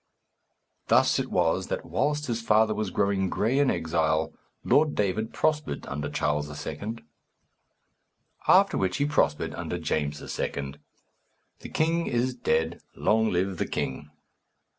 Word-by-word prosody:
Thus - - +4
it - - -2
was - - +1
that - - -3
whilst 150 0 0
his 115 -3 -2
father 110 0 +3
was 110 -2 -2
growing 100 -1 +1
gray 120 +9 +1
in 140 -2 +4
exile, 80 -1 0 0.3
Lord 150 0 +3
David 105 +2 0
prospered 150 -1 -1
under 70 +1 -4
Charles 75 0 -1 0.2
II. 110 +3 -4 1.5
After - - +5
which 95 -1 0
he 145 - +1
prospered 145 - +1
under 90 - -4
James 75 -3 -2
II. 70 -1 -4 0.9
The - - -9
king 165 +2 +1
is 125 +1 0
dead. 80 -8 0
Long 110 0 +2
live 95 0 -1
the - - 0
king! 75 - -3
100 Hz, 135 wpm, -27 LUFS, 80-125 Hz, 1.5 s, After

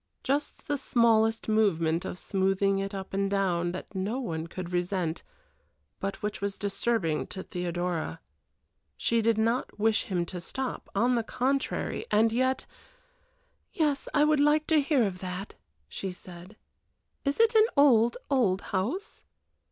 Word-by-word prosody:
Just 285 +2 -2
the 290 -1 -1
smallest 225 -3 +3
movement 175 -6 +2
of - - -5
smoothing 195 +1 +1
it 195 0 -3
up 195 0 -7
and 195 0 0
down 180 -3 +1
that 185 - -7
no 200 +6 -2
one 165 -9 -3
could 180 +1 -6
resent, 175 -2 -1 0.8
but 195 +1 -4
which 210 -1 -3
was 200 0 -2
disturbing 195 - -1
to 190 - -7
Theodora. 175 -2 -3 0.8
She 230 0 +1
did 225 0 +2
not 230 +3 0
wish 220 0 +2
him 180 -3 -1
to 180 0 -6
stop, 260 +8 -5
on 240 +5 +3
the 235 - +2
contrary 260 +4 -1
and 220 +2 +3
yet 260 +2 +1 1.1
"Yes, 295 -4 0
I 295 -1 +4
would 305 -1 +3
like 300 +1 +4
to 305 - +6
hear 280 -3 +2
of 185 -2 -3
that," 185 +2 -5 0.3
she 190 - -5
said. 180 +3 -12 0.7
"Is 280 +5 -1
it 455 +1 +5
an 440 0 +6
old, 240 -5 +5
old 215 -9 +2
house?" 235 - -2
205 Hz, 150 wpm, -28 LUFS, 185-255 Hz, 1.1 s, to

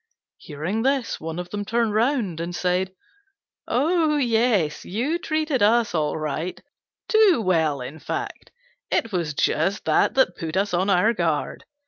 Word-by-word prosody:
Hearing 160 +9 -4
this, 270 -1 0
one 160 +1 -5
of 180 0 -6
them 205 0 -3
turned 230 +1 0
round 220 - 0
and 170 +1 -4
said, 185 +1 -1 0.7
"Oh, 310 +3 +2
yes, 225 - +1
you 260 - -2
treated 310 -5 -1
us 225 +2 +3
all 155 -2 0
right 155 +3 -3 0.5
too 435 - +5
well, 160 - +1
in 140 +5 -7
fact; 405 - -5 0.4
it 225 - 0
was 170 -6 -2
just 185 +9 0
that - - +2
that 260 -9 +3
put 165 +2 -4
us 200 0 0
on 185 +3 +1
our 200 +5 +3
guard. 165 -7 -2
200 Hz, 150 wpm, -23 LUFS, 170-250 Hz, 0.7 s, too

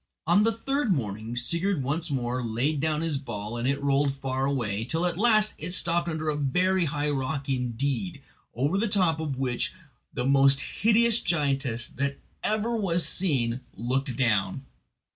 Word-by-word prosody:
On 175 +5 +4
the 225 +2 +3
third 270 +1 -1
morning 110 - -3
Sigurd 170 +6 0
once 155 +6 -2
more 125 -2 -2
laid 125 +7 -1
down 155 +1 0
his 160 -4 -1
ball, 110 -4 -6
and 120 +1 -2
it 140 +1 0
rolled 140 0 +1
far 135 0 -2
away, 110 -7 -1
till 160 +8 -1
at 175 -2 0
last 215 +1 +3
it 175 +3 0
stopped 170 -1 +2
under 155 -1 -3
a 155 - +1
very 180 +6 +1
high 145 0 -1
rock 135 0 -3
indeed, 135 - -2 0.4
over 145 - 0
the 230 - +1
top 180 -6 +2
of 150 -4 -3
which 125 -2 -1 0.4
the 125 -3 -3
most 135 0 +6
hideous 230 +1 +3
giantess 135 -8 -1
that 140 +1 -3 0.3
ever 220 +2 0
was 175 -7 +1
seen 130 -10 +1
looked 130 +2 -2
down. 115 0 0
140 Hz, 165 wpm, -26 LUFS, 130-175 Hz, 0.4 s, most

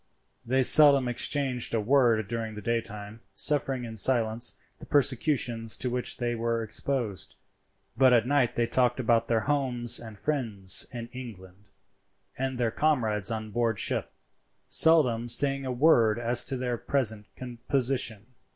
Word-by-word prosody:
They 130 +2 0
seldom 140 -2 +8
exchanged 125 0 -2
a - - 0
word 115 -2 +1
during 115 -1 -5
the 105 - -8
daytime, 110 -1 -5
suffering 135 -2 -1
in 115 -1 -9
silence 115 0 +1 0.2
the - - -13
persecutions 125 -5 0
to 125 - -4
which 125 0 -3
they 120 -1 -3
were 115 0 -3
exposed; 110 -2 -4 0.6
but 130 +1 +4
at 120 -2 +3
night 130 -2 0
they 120 - 0
talked 125 +1 0
about 115 -2 0
their 115 -1 0
homes 125 -3 +3
and 110 -3 -12
friends 110 -8 +1
in 120 -2 -8
England, 105 -6 -12 0.7
and 130 -1 -4
their 120 -2 -1
comrades 110 -9 -1
on 110 -1 -6
board 115 -1 -1
ship, - - -2 0.6
seldom 125 -8 +3
saying 135 +2 +2
a - - -3
word 120 -5 +2
as 120 +1 0
to 135 - -4
their 125 -2 -4
present 110 -6 -3 0.4
position. 125 -5 -2
120 Hz, 145 wpm, -26 LUFS, 110-130 Hz, 0.7 s, seldom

